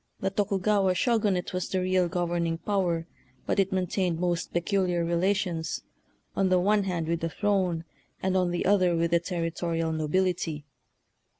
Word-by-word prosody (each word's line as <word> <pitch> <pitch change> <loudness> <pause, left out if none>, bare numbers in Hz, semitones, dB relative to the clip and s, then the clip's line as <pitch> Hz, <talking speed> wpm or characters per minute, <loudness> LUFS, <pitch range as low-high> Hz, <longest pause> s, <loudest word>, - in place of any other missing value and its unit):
The 195 - -1
Tokugawa 195 -1 +1
Shogunate 210 -5 +1
was 185 -1 -2
the 190 - 0
real 185 -1 +2
governing 170 -1 -1
power, 175 -3 0 0.4
but - - 0
it 195 -1 +2
maintained 180 -2 0
most 175 -1 -1
peculiar 175 -1 0
relations, 175 -1 0 0.5
on 195 -1 +2
the 185 - +4
one 200 +2 +2
hand 175 -4 -2
with 170 0 0
the 165 - -2
throne, 185 -3 0 0.4
and 190 0 0
on 180 -1 +2
the 175 0 -2
other 185 -3 +4
with 165 0 +1
the 170 - +4
territorial 165 -1 -2
nobility. 160 -1 -1
180 Hz, 155 wpm, -27 LUFS, 170-190 Hz, 0.5 s, the